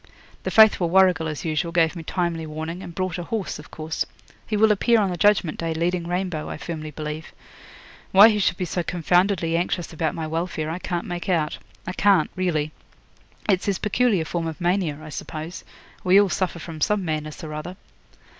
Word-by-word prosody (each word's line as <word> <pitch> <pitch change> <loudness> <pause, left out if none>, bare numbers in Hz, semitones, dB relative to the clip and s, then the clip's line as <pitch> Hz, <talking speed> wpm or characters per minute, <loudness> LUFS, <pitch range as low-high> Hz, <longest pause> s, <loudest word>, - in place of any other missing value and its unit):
'The - - -3
faithful 215 -6 +6
Warrigal, 180 -3 +4
as 155 0 -5
usual, 160 +1 -1
gave 165 0 +2
me 170 - -5
timely 165 -1 -2
warning, 160 +3 -5
and 170 - -9
brought 185 -2 -2
a - - -3
horse, 200 -1 -3
of 150 - -12
course. 160 +1 -3 0.4
He 215 - 0
will 220 +1 +5
appear 230 +3 +3
on 200 -3 +1
the - - -2
Judgment 190 -2 +2
Day 165 -1 -2
leading 170 +1 -1
Rainbow, 180 -3 -2
I - - -5
firmly 155 -1 -5
believe. 150 +1 -6 0.8
Why 200 +4 +9
he 210 -2 +1
should 190 -3 +1
be 180 - -1
so 175 +1 -2
confoundedly 175 0 +1
anxious 175 0 -1
about 160 0 -1
my 160 - -3
welfare 160 -1 -2
I 170 - -4
can't 175 -2 -3
make 175 0 -5
out 160 -4 0 0.3
I 185 - -4
can't, 195 -5 +3
really. 160 -5 0 0.8
It's 190 -3 +2
his 200 -2 +1
peculiar 210 -4 +1
form 165 0 -2
of 160 +1 -6
mania, 175 -4 0
I 155 - -8
suppose. 155 +3 -6 0.4
We 185 +2 +6
all 205 -1 +4
suffer 185 -1 -1
from 160 -1 -8
some 210 +1 +1
madness 155 -1 -4
or 155 -1 -6
other.' 165 +5 -6
175 Hz, 195 wpm, -24 LUFS, 160-185 Hz, 0.8 s, Why